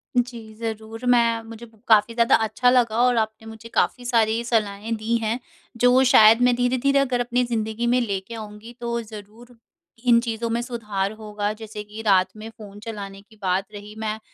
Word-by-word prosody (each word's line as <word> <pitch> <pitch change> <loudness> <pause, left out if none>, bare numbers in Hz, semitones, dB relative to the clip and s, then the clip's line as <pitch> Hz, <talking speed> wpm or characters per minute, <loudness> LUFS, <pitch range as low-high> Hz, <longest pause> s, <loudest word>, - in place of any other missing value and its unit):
जी। 235 -3 -2
ज़रूर, 225 +1 -6
मैं 235 -2 +3
मुझे 225 +1 -10 0.2
काफ़ी 220 0 +4
ज़्यादा 235 0 +4
अच्छा 225 +3 +2
लगा 240 -3 +2
और 250 -1 +3
आपने 220 0 -2
मुझे 220 +1 -11
काफ़ी 245 - 0
सारी 230 -1 +1
सलाहें 220 -1 -1
दी 220 +2 -1
हैं 225 +3 -1 0.4
जो 245 +2 +5
शायद 225 -2 +6
मैं 245 0 +4
धीरे-धीरे 255 +3 +2
अगर 255 -3 0
अपनी 245 +1 0
ज़िंदगी 225 0 -2
में 245 +1 +3
लेके 200 -1 -4
आऊँगी 215 +1 -9
तो 235 0 -2
ज़रूर 220 +2 -12 0.5
इन 235 -1 +6
चीज़ों 230 -1 -3
में 230 +1 -1
सुधार 210 -5 -3
होगा। 210 -1 -3
जैसे 215 -1 -8
कि 210 +1 -9
रात 190 -2 +5
में 215 +1 -8
फ़ोन 205 -3 -12
चलाने 200 -3 -8
की 220 +2 -22
बात 190 0 0
रही, 205 +1 -10
मैं 220 0 -3
225 Hz, 180 wpm, -23 LUFS, 215-240 Hz, 0.5 s, शायद